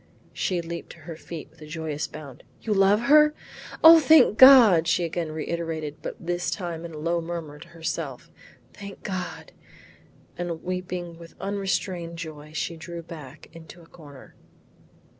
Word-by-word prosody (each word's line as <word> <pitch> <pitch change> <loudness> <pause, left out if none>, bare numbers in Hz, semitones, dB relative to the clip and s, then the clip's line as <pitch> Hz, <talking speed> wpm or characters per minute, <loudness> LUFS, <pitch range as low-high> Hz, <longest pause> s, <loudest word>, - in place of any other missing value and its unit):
She 180 -2 -1
leaped 170 +1 -7
to - - -18
her 165 +2 -8
feet 160 0 -9
with - - -24
a 155 - -10
joyous 155 -2 -4
bound. 145 -5 -11 0.2
"You 220 - -2
love 200 +2 +3
her? 300 +4 +5 0.5
O 325 +1 +10
thank 305 -8 +5
God!" 230 -11 +8
she 170 +1 +2
again 165 -1 -3
reiterated 160 -1 -4
but - - -6
this 175 +1 -3
time 170 -4 -5
in 165 -2 -9
a - - -8
low 170 +2 -1
murmur 165 -3 -7
to 170 - -12
her 170 -1 -16
self. - - -5 0.4
"Thank 200 -1 -11
God!" 185 -3 -6 0.9
and 170 -2 -4
weeping 180 -2 -5
with 170 0 -13
unrestrained 185 -3 -3
joy, 155 -2 -9
she 165 +2 -4
drew 170 +1 -8
back 155 -6 -11
into 165 +1 -13
a - - -17
corner. 145 -5 -15
170 Hz, 160 wpm, -25 LUFS, 160-185 Hz, 0.9 s, O